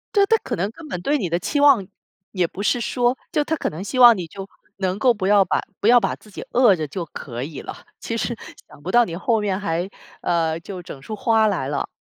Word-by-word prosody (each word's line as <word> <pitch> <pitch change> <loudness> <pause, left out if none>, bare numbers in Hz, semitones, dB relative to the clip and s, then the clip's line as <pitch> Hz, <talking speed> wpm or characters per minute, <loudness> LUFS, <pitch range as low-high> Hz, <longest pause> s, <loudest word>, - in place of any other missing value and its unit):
对， 400 -1 +5
她 450 - +4
可 - - -3
能 195 +5 -2
根 315 +5 -12
本 180 - -5
对 290 +10 +1
你 185 -9 -2
的 170 - +1
期 285 - -2
望 275 -9 +5 0.5
也 180 -4 0
不 200 - -7
是 245 - +2
说 245 +2 0 0.2
就 295 - +2
她 320 - -3
可 - - -2
能 160 +5 -7
希 255 +5 -3
望 240 -4 +9
你， 180 - -4
就 195 +4 -9 0.3
能 190 -1 -1
够 250 +1 +4
不 200 -4 -3
要 205 -1 +6
把 - - 0 0.2
不 205 - +2
要 245 +1 +7
把 195 - -1
自 210 - -19
己 - - -7
饿 240 -5 +5
着 155 -4 -3
就 175 +5 -5
可 120 -2 -7
以 145 -1 -7
了， - - -7 0.2
其 - - -4
实 - - -1 0.3
想 - - -17
不 175 - -6
到 240 0 +6
你 170 - -5
后 225 +2 +1
面 200 -2 -1
还 175 -1 -2 0.3
呃， 165 -2 0
就 185 0 -8
整 140 -5 -10
出 215 - -7
花 220 -1 +3
来 180 -10 -1
了。 145 -1 -2
200 Hz, 275 characters per minute, -22 LUFS, 175-240 Hz, 0.5 s, 望